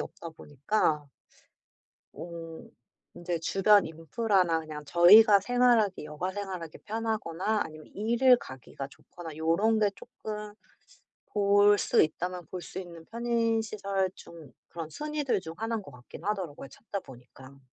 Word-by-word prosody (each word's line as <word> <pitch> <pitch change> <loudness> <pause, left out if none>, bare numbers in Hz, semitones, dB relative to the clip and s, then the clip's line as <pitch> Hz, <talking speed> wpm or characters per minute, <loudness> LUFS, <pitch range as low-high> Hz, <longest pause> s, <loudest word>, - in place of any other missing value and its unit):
없다 170 - -7
보니까 150 0 -1 1.1
어 165 -1 -8 0.5
인제 175 0 -3
주변 195 +4 +4
인프라나 165 +2 0
그냥 155 -1 -8
저희가 200 +7 +7
생활하기 235 -5 +2
여가 150 +5 -4
생활하기 185 -5 -6
편하거나 215 -2 -2
아니면 155 -1 -11
일을 235 +5 +4
가기가 130 - -9
좋거나 160 +2 -11
요런 170 +8 +2
게 210 -1 +3
쪼끔 210 -4 -8 0.8
볼 205 0 +4
수 - - +3
있다면 175 +2 -3
볼 180 +1 -7
수 - - -8
있는 170 -3 -11
편의 230 -1 0
시설 195 -3 -2
중 160 -6 -13 0.2
그런 165 -2 -7
순위들 295 - -2
중 160 -2 -8
하나인 225 -1 -2
것 145 - -12
같긴 125 +7 -13
하더라고요 185 -10 -3
찾다 200 - -7
보니까. 130 0 -15
185 Hz, 290 characters per minute, -29 LUFS, 160-215 Hz, 1.1 s, 저희가